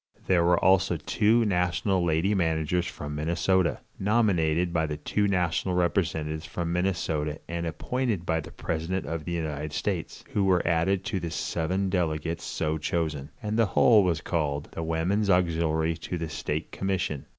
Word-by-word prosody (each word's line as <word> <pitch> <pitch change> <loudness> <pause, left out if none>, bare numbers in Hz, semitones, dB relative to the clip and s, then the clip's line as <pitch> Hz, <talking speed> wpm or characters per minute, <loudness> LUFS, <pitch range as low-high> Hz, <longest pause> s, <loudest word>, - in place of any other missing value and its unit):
There 90 -3 +3
were 90 +1 +4
also 95 -2 +3
two 110 +8 +2
national 90 0 +1
lady 85 +4 +2
managers 85 -1 +1
from 75 0 -6
Minnesota, 85 +3 +1 0.2
nominated 90 -6 +2
by 80 -2 +1
the 75 -1 -4
two 100 +7 0
national 90 -1 0
representatives 80 -3 0
from 85 -1 -3
Minnesota 85 -5 -1
and 85 0 -3
appointed 105 - -2
by 80 -1 +1
the 80 - -7
president 85 +4 -3
of 80 -2 -4
the 85 - -3
United 75 -2 -3
States, - - -3
who 100 - +2
were 95 -3 +2
added 90 +3 +1
to 95 - -1
the 85 - -4
seven 90 +4 -1
delegates 85 -2 -1
so 80 0 -2
chosen, 75 -3 -2
and 110 +2 -1
the 115 - +4
whole 110 -4 +7
was 85 -3 0
called 75 -3 -2
"The - - -5
Woman's 85 +6 0
Auxiliary 85 -3 +2
to 90 +2 -4
the 80 -1 -4
State 75 0 -3
Commission." 95 -7 -2
85 Hz, 160 wpm, -27 LUFS, 80-95 Hz, 0.2 s, whole